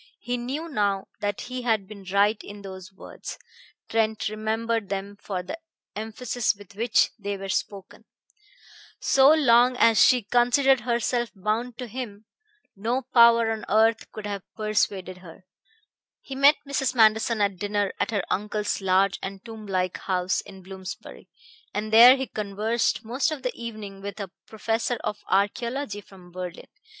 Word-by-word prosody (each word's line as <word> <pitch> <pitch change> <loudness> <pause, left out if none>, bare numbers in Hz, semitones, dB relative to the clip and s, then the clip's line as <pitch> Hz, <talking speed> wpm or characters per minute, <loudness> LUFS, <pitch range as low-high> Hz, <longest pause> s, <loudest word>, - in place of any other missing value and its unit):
He 245 - -3
knew 265 +7 -4
now 205 -9 -1
that 205 -2 -2
he 255 +1 -5
had 220 -5 0
been 205 -1 -11
right 205 +2 +3
in 205 0 -10
those 190 -1 -9
words 190 - -9 0.5
Trent 220 -1 0
remembered 220 0 -2
them 200 +1 -4
for 195 -2 -5
the 325 - -7 0.4
emphasis 220 +2 -1
with 200 -1 -15
which 230 +3 +2
they 200 0 -3
were 195 0 -7
spoken 195 0 -4 0.9
"So 270 0 +5
long 250 -5 +5
as 225 -3 +6
she 250 -3 +5
considered 245 +4 +3
herself 240 +1 0
bound 220 +5 -2
to 250 - -5
him... 225 -3 -7 0.5
no 235 +6 -1
power 235 -1 +6
on 220 -1 -4
earth 220 +1 +2
could 215 - -8
have 200 -1 -4
persuaded 205 -4 -1
her." 180 +1 -14 0.7
He 270 - -9
met 280 +3 +6
Mrs. 270 -2 -1
Manderson 220 0 +4
at 200 -2 +1
dinner 205 0 -1
at - - 0
her 205 -4 -1
uncle's 210 +1 -2
large 190 +1 +2
and 195 +1 -7
tomb 220 -2 -9
like 185 -2 -1
house 185 -1 0
in 190 -1 -13
Bloomsbury, 190 0 -9 0.5
and 215 +1 -3
there 240 +3 +10
he 265 0 -3
conversed 215 +2 -1
most 255 +7 0
of 290 -4 -5
the 250 - -1
evening 215 -4 -8
with 200 +1 -7
a 195 -3 -5 0.2
professor 225 +2 -1
of 210 - -4
archaeology 205 +4 0
from 185 -3 -16
Berlin. 180 -1 -7
215 Hz, 155 wpm, -25 LUFS, 200-240 Hz, 0.9 s, there